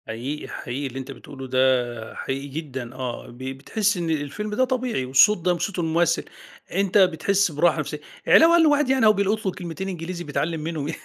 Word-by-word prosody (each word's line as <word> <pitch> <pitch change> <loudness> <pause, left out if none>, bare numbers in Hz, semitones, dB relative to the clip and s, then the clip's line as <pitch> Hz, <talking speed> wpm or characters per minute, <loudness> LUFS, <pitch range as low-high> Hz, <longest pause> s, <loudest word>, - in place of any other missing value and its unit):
حقيقي 130 +7 -5
حقيقي، 135 +3 -5
اللي 130 +1 -6
أنتَ 130 - -7
بتقوله 135 -2 -10
ده 125 -3 +1
حقيقي 135 +1 -4
جدًا، 130 -4 -6
آه 125 -2 -5
ب 120 - -13
بتحِس 140 - -1
إن 170 -2 -2
الفيلم 155 +7 -3
ده 255 - +3
طبيعي، 250 - -1
والصوت 135 +12 +5
ده 180 +1 +1
وصوت 180 +2 -3
الممثّل، 165 0 +1 0.5
أنتَ 195 +2 +1
بتحس 190 +1 +3
براحة 160 +2 +2
نفسيِّة، 150 0 -4 0.3
علاوة 330 +1 +7
على 345 - +6
إن - - +5
الواحد 295 -2 +3
يعني 265 -3 +3
أهو 215 - +7
بيلقُط 205 +2 0
له 190 - +1
كلمتين 180 +1 -6
إنجليزي 175 0 -5
بيتعلَّم 160 +1 -2
منهم 155 -1 -3
165 Hz, 190 wpm, -24 LUFS, 135-195 Hz, 0.5 s, علاوة